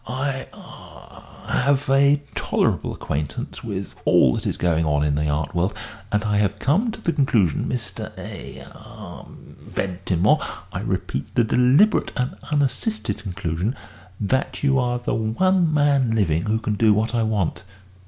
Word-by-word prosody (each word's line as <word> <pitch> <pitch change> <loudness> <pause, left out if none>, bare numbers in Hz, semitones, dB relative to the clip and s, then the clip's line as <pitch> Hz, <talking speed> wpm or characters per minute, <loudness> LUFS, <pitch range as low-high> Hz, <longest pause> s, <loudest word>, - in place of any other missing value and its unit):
I 135 +1 -2
ah - - -14
have 140 +2 +1
a 140 +2 +4
tolerable - - 0
acquaintance 75 0 -4
with - - -5
all 65 - +5
that - - -3
is - - -2
going 80 -2 +1
on 75 -2 +1
in 75 -1 +1
the 75 +1 0
art 75 +1 -1
world, 90 +3 0 0.4
and 105 +1 +1
I 105 -1 +1
have 100 0 +1
come 170 - +1
to 220 - -6
the 170 - -1
conclusion, 110 - +2
Mr. - - -3
eh 65 -1 -8
ah 110 -5 -11
Ventimore, 90 -2 -1 0.3
I - - -3
repeat, 65 - -3
the 120 - +4
deliberate 125 - +4
and 125 0 -1 0.2
unassisted 145 - 0
conclusion, 95 - -3 0.4
that 130 +8 -1
you 135 -1 +3
are 125 -1 0
the 120 - -3
one 165 - +2
man 140 -6 +3
living 85 -6 +1
who 110 +1 +1
can 110 -1 -2
do 105 0 +4
what 110 +3 0
I 120 - +1
want." 105 -7 -1
110 Hz, 155 wpm, -22 LUFS, 90-135 Hz, 0.4 s, all